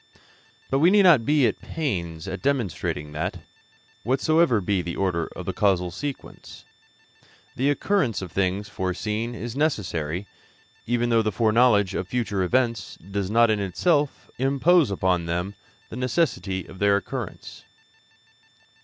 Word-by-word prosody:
But 135 - +2
we 165 +4 +6
need 205 +1 +5
not 160 -11 +6
be 145 -3 +4
at - - 0
the - - -17
pains 85 - -3
of 95 0 -5
demonstrating 105 - -2
that, 75 +1 -4 0.6
whatsoever 135 +1 +2
be 95 0 0
the 85 0 -5
order 90 -4 -1
of - - -7
the - - -3
causal 90 -4 +1
sequence, 140 +10 -8 0.9
the 135 +3 +1
occurrence 145 - +1
of 90 - -8
things 100 +1 -1
foreseen 105 +5 -3
is 115 +2 -6
necessary, 90 - -1 0.6
even 120 0 +1
though 115 -1 +4
the 110 -1 -1
foreknowledge 110 -1 +3
of 95 - -3
future 110 -4 -1
events 115 +4 0
does 100 -1 -2
not 115 +1 +4
in 105 - +1
itself 145 - 0
impose 140 - +3
upon 90 -3 0
them 90 +4 -2 0.4
the - - -8
necessity 120 - -1
of 95 - -13
their 100 0 +4
occurrence. 100 - -7
110 Hz, 145 wpm, -24 LUFS, 95-135 Hz, 0.9 s, we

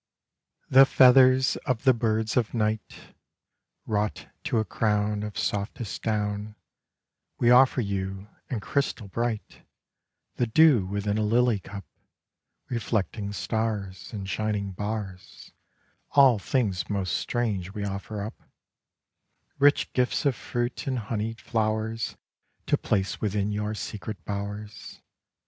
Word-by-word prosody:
The 135 +1 +7
feathers 130 0 +6
of 125 -2 0
the 130 -2 +6
birds 110 -1 0
of 120 -1 0
night 110 -2 -3 0.7
Wrought 105 -1 -2 0.2
to 145 -6 0
a 110 - +1
crown 105 -1 0
Of 105 -1 -6
softest 105 +2 -3
down 105 -1 -2 0.8
We 120 - +4
offer 130 +1 +6
you, 95 -1 -3 0.2
and 115 -6 -3
crystal 135 -7 -1
bright, 115 +1 -3 0.8
The 120 - +1
dew 125 -5 +5
within 100 +2 -1
a - - +1
lily 115 +1 +2
cup 100 0 -9 0.8
Reflecting 110 -3 -2
stars 100 0 -3
In 100 -4 -5
shining 100 0 -2
bars; 100 -1 -6 0.6
All 135 -6 +6
things 100 -4 -1
most 100 -3 -1
strange 100 -6 -2
we 100 -1 -3
offer 100 +1 -4
up 110 +3 -8 0.6
— - - -47
Rich 145 +1 +4
gifts 125 +3 +1
of 140 -3 +3
fruit 120 +5 -3
and 130 -1 0
honeyed 110 0 -3
flowers 110 0 -2 0.5
To - - +3
place 100 -2 -1
within 105 -1 0
your 105 +1 -2
secret 100 -4 -6
bowers. 105 +1 -6
110 Hz, 120 wpm, -26 LUFS, 100-120 Hz, 0.8 s, The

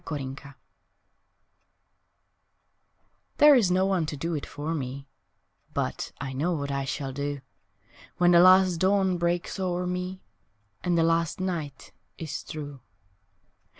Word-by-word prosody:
Last 155 - -2
Things 135 0 -6 3.0
THERE 295 0 +8
is 235 -9 +4
no 185 +1 +2
one 185 -5 0
to 150 - -5
do 165 +4 -3
it 150 - -4
for 150 +3 -4
me, 135 -2 -5 0.7
But - - -2
I 135 -1 -5
know 160 +7 0
what 140 -3 -3
I 140 0 -2
shall 135 0 -4
do 145 0 -4 0.8
When 175 0 +4
the 170 - +7
last 185 0 +6
dawn 190 0 +2
breaks 175 +3 -1
o'er 180 -1 -1
me 180 +1 -4 0.6
And 175 -1 +1
the 165 - +4
last 165 0 +1
night 165 -7 -4 0.3
is 160 -3 -5
through. 145 -3 -8
165 Hz, 135 wpm, -27 LUFS, 145-180 Hz, 3.0 s, THERE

